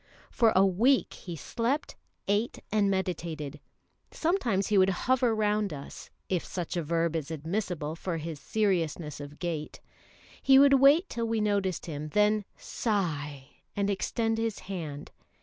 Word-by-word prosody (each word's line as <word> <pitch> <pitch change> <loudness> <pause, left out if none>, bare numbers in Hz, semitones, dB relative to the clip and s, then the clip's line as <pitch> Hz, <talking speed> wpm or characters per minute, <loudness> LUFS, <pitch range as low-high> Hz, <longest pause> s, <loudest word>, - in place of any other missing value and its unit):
For 230 -3 +4
a 190 +1 +6
week 230 +9 +3
he 175 -3 -8
slept, 240 - -2 0.3
ate, 205 +4 0
and 210 -2 +3
meditated. 170 -6 -3 0.5
Sometimes 250 - 0
he 210 - +3
would 190 0 +5
hover 245 +4 +2
round 210 -2 +1
us, 140 -2 -9 0.2
if 180 -3 0
such 180 0 -4
a 175 - 0
verb 165 +1 0
is 155 -2 -3
admissible 160 -1 -3
for 170 0 -3
his 160 -1 -5
seriousness 170 -7 -1
of 145 +1 -9
gait. 165 -4 -4 0.6
He 270 0 +6
would 280 0 +7
wait 290 +7 +6
till 230 -1 -3
we 225 0 0
noticed 200 -4 0
him, 155 -2 -5
then 210 0 +3
sigh 150 - -2 0.3
and 200 0 +1
extend 225 +3 -1
his 225 -2 -1
hand. 160 -7 -6
190 Hz, 150 wpm, -29 LUFS, 165-220 Hz, 0.6 s, would